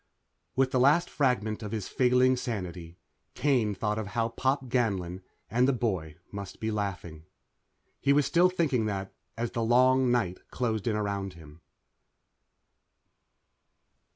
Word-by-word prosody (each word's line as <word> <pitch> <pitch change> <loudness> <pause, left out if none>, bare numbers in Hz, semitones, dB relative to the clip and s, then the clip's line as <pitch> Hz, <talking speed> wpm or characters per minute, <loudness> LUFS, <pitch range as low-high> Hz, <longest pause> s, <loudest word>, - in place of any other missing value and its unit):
_ - - -46 0.5
With 130 0 +2
the 130 - +2
last 150 +7 +4
fragment 120 -6 0
of 105 -2 -6
his 110 -4 -3
failing 130 0 +3
sanity, 90 -9 -5 0.4
Kane 120 -8 +1
thought 105 +2 -1
of 110 - -4
how 115 +2 -1
Pop 130 +4 0
Ganlon 95 -8 -1 0.3
and 125 +2 +2
the 135 - +3
boy 95 -11 -2 0.2
must 100 -3 -7
be 110 0 -2
laughing. 90 -7 -4 0.7
He 140 - +2
was 145 0 +4
still 175 +6 +4
thinking 145 -11 0
that 95 -2 -4 0.2
as 115 0 -2
the 115 - -2
long 130 +2 +4
night 105 -7 0
closed 115 -3 -2
in 110 - +1
around 100 -2 -2
him. 80 -1 -15
115 Hz, 145 wpm, -28 LUFS, 100-130 Hz, 0.7 s, last